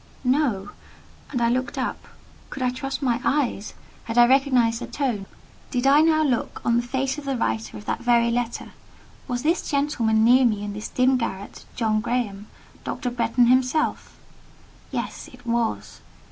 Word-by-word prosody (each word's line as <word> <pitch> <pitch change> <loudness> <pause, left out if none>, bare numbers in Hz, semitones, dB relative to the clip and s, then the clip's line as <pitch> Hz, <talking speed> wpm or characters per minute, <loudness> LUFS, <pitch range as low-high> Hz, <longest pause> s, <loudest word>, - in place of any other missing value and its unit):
No: 250 -7 +1 0.6
and 250 - -1
I 235 - +3
looked 255 +2 -1
up. - - -3 0.4
Could 265 - -5
I 250 - +2
trust 270 +2 -4
my 245 -2 +1
eyes? 260 -8 -1 0.3
Had 230 +1 -4
I 240 - +8
recognised 250 -3 +3
the - - -5
tone? 235 -9 -2 0.4
Did 250 -1 -1
I 280 +2 +6
now 315 -1 +4
look 255 -6 -1
on 235 - +3
the - - +3
face 265 +3 -2
of 290 - -11
the 270 -2 -1
writer 110 - -2
of 105 - -11
that - - -2
very 235 -1 +3
letter? 240 0 -3 0.6
Was 245 -1 -3
this 330 +4 0
gentleman 240 -7 +1
near 250 +3 +6
me 215 -4 +1
in 205 0 -4
this 210 +1 -5
dim 255 +1 +3
garret, 200 -4 -5
John 215 -2 +1
Graham—Dr. 235 +1 -4
Bretton 240 0 +2
himself? 255 +5 +1 0.7
Yes: - - -5
it - - -16
was. 235 -1 -2
245 Hz, 165 wpm, -24 LUFS, 230-265 Hz, 0.7 s, I